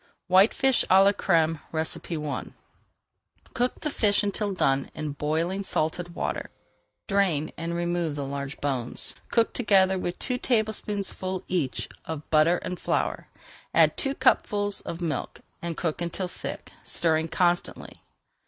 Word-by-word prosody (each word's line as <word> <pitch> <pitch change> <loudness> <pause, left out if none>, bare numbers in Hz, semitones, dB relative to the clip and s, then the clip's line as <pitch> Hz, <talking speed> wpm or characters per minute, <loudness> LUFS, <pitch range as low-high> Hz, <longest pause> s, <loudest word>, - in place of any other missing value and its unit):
WHITEFISH 220 +8 +5
À 190 +1 +7
LA 200 - +6
CRÈME 165 -5 +2 0.2
I 160 -1 -3 1.0
Cook 245 +1 0
the 300 - -1
fish 205 -6 +3
until 205 0 -1
done 135 -7 +1
in 155 -1 -3
boiling 160 +6 -1
salted 175 -1 -2
water, - - -3 0.6
drain, 185 -7 +1
and 170 +1 -3
remove 175 -2 -1
the 140 -1 -3
large 140 +1 -5
bones. 130 -4 -1 0.2
Cook 230 -1 +2
together 190 -5 +3
two 250 +6 -2
tablespoonfuls 210 -5 -1
each 165 -8 -1 0.2
of 155 -2 -6
butter 160 +3 +5
and 180 - -4
flour, - - -1 0.5
add - - +5
two 275 -1 0
cupfuls 205 -6 +2
of 170 +1 -6
milk, 155 -6 -3 0.2
and 170 -2 -4
cook 165 -1 -2
until 175 +2 -2
thick, - - -7
stirring 160 -1 +1
constantly. 175 +1 -1
175 Hz, 130 wpm, -26 LUFS, 155-200 Hz, 1.0 s, À